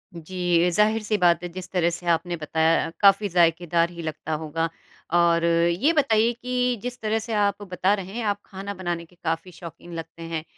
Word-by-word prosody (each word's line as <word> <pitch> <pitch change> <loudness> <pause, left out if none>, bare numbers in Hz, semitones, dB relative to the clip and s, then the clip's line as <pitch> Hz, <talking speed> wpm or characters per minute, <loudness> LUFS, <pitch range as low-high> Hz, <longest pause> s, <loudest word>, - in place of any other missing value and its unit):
जी, 175 +1 +1
ज़ाहिर 215 +4 +2
सी 215 0 0
बात 175 -3 +4
है 175 - -2
जिस 185 0 -7
तरह 175 -2 +2
से 175 +1 -7
आपने 175 +1 +1
बताया 160 +1 +1
काफ़ी 200 0 +5
ज़ायकेदार 170 -1 +2
ही 170 -1 -8
लगता 155 0 -4
होगा 160 +2 -2 0.4
और 170 -1 +4
ये 170 - +3
बताइए 235 -7 +3
कि 250 +1 -1
जिस 245 0 -5
तरह 220 0 0
से 225 +1 -5
आप 205 -1 +1
बता 185 +2 +2
रहे 195 -2 -4
हैं, 235 0 -3
आप 205 -1 0
खाना 195 +1 -7
बनाने 175 -3 -4
के 180 - -24
काफ़ी 165 +3 -2
शौक़ीन 170 0 -11
लगते 165 0 -8
हैं। 165 -1 -4
175 Hz, 195 wpm, -24 LUFS, 170-205 Hz, 0.4 s, काफ़ी